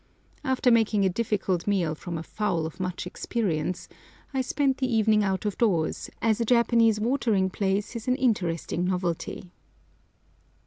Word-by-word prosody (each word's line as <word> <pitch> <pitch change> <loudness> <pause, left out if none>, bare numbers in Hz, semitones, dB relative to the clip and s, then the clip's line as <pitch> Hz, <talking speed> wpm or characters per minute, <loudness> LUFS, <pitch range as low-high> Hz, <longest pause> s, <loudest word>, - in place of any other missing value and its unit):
After 260 -1 +2
making 220 -3 +3
a - - +4
difficult 195 -4 -1
meal 180 -6 +1
from 170 +2 -6
a 160 - -5
fowl 175 -5 -1
of 160 - -7
much 180 -1 -3
experience, 180 -4 -2 0.5
I 265 - +1
spent 270 +1 0
the 260 -2 -1
evening 215 -1 +3
out 190 0 -1
of 205 - -2
doors, 180 -9 +1
as 225 0 +2
a - - +1
Japanese 230 -2 +4
watering 220 -5 +1
place 200 +3 -1
is 230 +1 -6
an 250 - +3
interesting 180 - 0
novelty. 180 -1 -3
205 Hz, 150 wpm, -26 LUFS, 180-230 Hz, 0.5 s, a